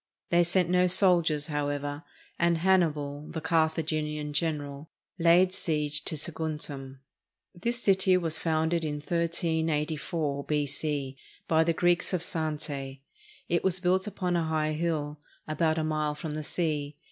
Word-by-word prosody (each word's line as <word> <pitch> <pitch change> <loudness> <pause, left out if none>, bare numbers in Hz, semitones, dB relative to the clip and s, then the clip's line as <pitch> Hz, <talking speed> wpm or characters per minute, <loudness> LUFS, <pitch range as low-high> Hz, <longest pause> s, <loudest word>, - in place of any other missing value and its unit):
They 175 0 +5
sent 175 +1 +2
no 180 +1 +3
soldiers, 170 -5 +4
however, 145 -1 -2 0.4
and 170 -1 +3
Hannibal, 155 -5 +1
the 165 - -4
Carthaginian 155 -2 0
general, 145 -1 -2 0.3
laid 175 +2 +5
siege 150 -4 0
to - - -2
Saguntum. 150 -4 -4 0.5
This 235 +7 -2
city 190 -1 +4
was 165 -3 -1
founded 160 +1 0
1384 160 -1 -1
B.C., 145 -2 -1 0.3
by 160 0 +4
the 165 +1 +1
Greeks 175 +2 +2
of 180 - 0
Zante. 150 -5 -3 0.5
It 170 0 0
was 185 -1 +1
built 185 +2 +1
upon 180 -3 -2
a 170 -1 +1
high 155 -1 0
hill, 155 -2 -2 0.3
about 160 +1 +1
a 160 - 0
mile 155 -1 -1
from 150 +1 -5
the 155 - -3
sea. 150 -2 -2
160 Hz, 135 wpm, -28 LUFS, 150-170 Hz, 0.5 s, They